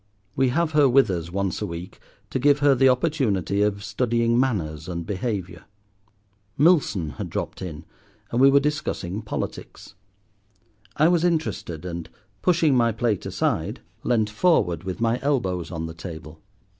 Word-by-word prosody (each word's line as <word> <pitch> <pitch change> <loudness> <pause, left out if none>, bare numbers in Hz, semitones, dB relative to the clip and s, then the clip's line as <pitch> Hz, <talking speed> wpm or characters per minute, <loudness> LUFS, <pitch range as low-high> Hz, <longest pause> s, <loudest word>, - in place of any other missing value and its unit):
We 135 -1 +3
have 160 +5 0
her 150 -3 +5
with 125 -4 +4
us 85 -2 -4
once 100 0 -2
a - - -1
week 85 +1 -8 0.3
to - - -1
give 145 +2 +4
her 145 -1 +4
the 135 0 +4
opportunity 125 - +1
of 100 -1 0
studying 115 +2 +1
manners 80 - -1
and 85 -1 -4
behaviour. 95 -4 -4 0.9
Milson 135 - +2
had - - -5
dropped - - -4
in, 85 -3 -7 0.5
and 120 - +1
we 135 - +8
were 140 +1 +6
discussing 125 -9 -2
politics. 110 -1 -6 1.0
I 155 - +4
was 175 -1 +3
interested, 155 - -1
and, 85 -2 -5 0.3
pushing 165 -6 +3
my 115 -2 +3
plate 110 -3 -1
aside, - - -1 0.2
leant 110 -3 +1
forward 100 - +2
with 95 +3 -5
my 115 +1 +1
elbows 105 - -1
on 80 -2 -4
the 80 - -6
table. 80 -2 -9
110 Hz, 155 wpm, -24 LUFS, 90-135 Hz, 1.0 s, we